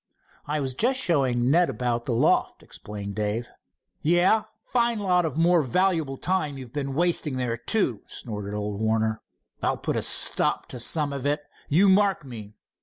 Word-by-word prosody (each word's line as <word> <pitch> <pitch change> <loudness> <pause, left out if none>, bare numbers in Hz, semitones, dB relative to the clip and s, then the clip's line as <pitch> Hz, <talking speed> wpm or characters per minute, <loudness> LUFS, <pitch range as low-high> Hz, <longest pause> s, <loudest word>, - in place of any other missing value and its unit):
"I 150 +1 -1
was 135 -2 -2
just 255 - +1
showing 130 - +2
Ned 175 +3 +4
about 120 -1 -2
the - - -2
loft," 115 - +1
explained 100 -1 -8
Dave. 105 +3 -2 0.5
"Yah! 175 +7 +3
Fine 235 -2 0
lot 180 -4 +2
of 160 - -3
more 170 +1 +4
valuable 160 0 0
time 155 -6 -1
you've 125 -3 -10
been 140 -2 -3
wasting 165 -4 +1
there, 125 -2 -1
too," 120 - 0
snorted 105 -3 -6
old 105 0 -4
Warner. 110 0 0 0.4
"I'll - - 0
put - - -3
a - - 0
stop - - +1
to 125 - -6
some 145 +3 +1
of 140 0 -3
it, 150 +1 0 0.3
you 180 +7 +4
mark 195 -4 +3
me. 110 -5 -10
140 Hz, 170 wpm, -25 LUFS, 115-175 Hz, 0.5 s, Ned